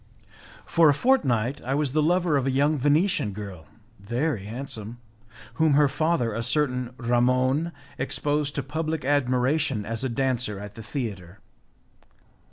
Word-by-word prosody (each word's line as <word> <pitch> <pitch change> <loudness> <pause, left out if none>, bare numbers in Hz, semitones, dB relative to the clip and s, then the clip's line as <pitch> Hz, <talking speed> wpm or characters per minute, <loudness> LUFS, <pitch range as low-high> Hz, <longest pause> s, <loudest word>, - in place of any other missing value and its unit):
For 165 -2 +4
a 145 - +4
fortnight 135 - +1
I 130 +2 -2
was 145 -2 0
the 155 +2 +2
lover 175 0 +2
of 135 -1 +1
a - - +2
young 145 +4 +2
Venetian 145 - +1
girl, 95 -5 -8 0.3
very 120 +2 -2
handsome, 115 -1 -6 0.6
whom 160 -2 +4
her 145 0 +5
father, 145 -5 0
a 115 - -2
certain 125 -1 -1
Ramon, 125 +6 +1 0.3
exposed 145 0 -1
to 145 - -2
public 155 +1 -3
admiration 135 -3 +1
as 115 +2 -3
a 130 - 0
dancer 125 -4 0
at 105 0 -8
the 115 - -9
theatre. 105 - -5
130 Hz, 145 wpm, -25 LUFS, 115-150 Hz, 0.6 s, her